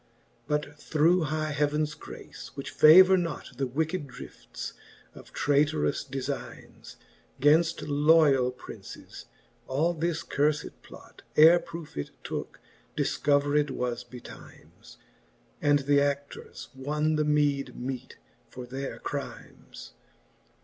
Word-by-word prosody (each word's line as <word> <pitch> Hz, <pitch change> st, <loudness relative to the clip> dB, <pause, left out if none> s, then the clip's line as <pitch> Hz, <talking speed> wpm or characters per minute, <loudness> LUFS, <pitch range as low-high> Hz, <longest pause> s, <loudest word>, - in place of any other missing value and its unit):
But 150 Hz, 0 st, -2 dB
through 160 Hz, +3 st, +2 dB
high 155 Hz, 0 st, -2 dB
heavens 150 Hz, +1 st, 0 dB
g^ace, -, -, -11 dB
which 140 Hz, -, -6 dB
favour 185 Hz, +5 st, +8 dB
not 170 Hz, -3 st, -4 dB
The 135 Hz, 0 st, -1 dB
wicked 160 Hz, +4 st, -2 dB
driftes -, -, -9 dB, 0.4 s
of -, -, -14 dB
trayterous 145 Hz, +1 st, +1 dB
defynes, 135 Hz, 0 st, -7 dB, 0.4 s
Gainft 160 Hz, +3 st, +3 dB
loiall 145 Hz, -4 st, +4 dB
Princes, -, -, -11 dB, 0.4 s
all 155 Hz, +6 st, +1 dB
this 165 Hz, 0 st, -2 dB
curfed 150 Hz, +1 st, 0 dB
plot, -, -, -15 dB, 0.2 s
Ere 165 Hz, +3 st, +8 dB
proofe 165 Hz, -, -10 dB
it 75 Hz, -, -3 dB
tooke, -, -, -6 dB, 0.4 s
difcovered 145 Hz, 0 st, +1 dB
was 125 Hz, -2 st, -3 dB
betymes, 125 Hz, 0 st, -14 dB, 0.6 s
And 145 Hz, -1 st, +3 dB
th'a6i:ours 140 Hz, 0 st, -1 dB
won 150 Hz, +4 st, -1 dB
the 155 Hz, -, +1 dB
meede 145 Hz, -2 st, +1 dB
meet 130 Hz, 0 st, -6 dB, 0.3 s
for 125 Hz, 0 st, -8 dB
their 135 Hz, +2 st, -6 dB
crymes. -, -, -8 dB
145 Hz, 110 wpm, -28 LUFS, 140-155 Hz, 0.6 s, favour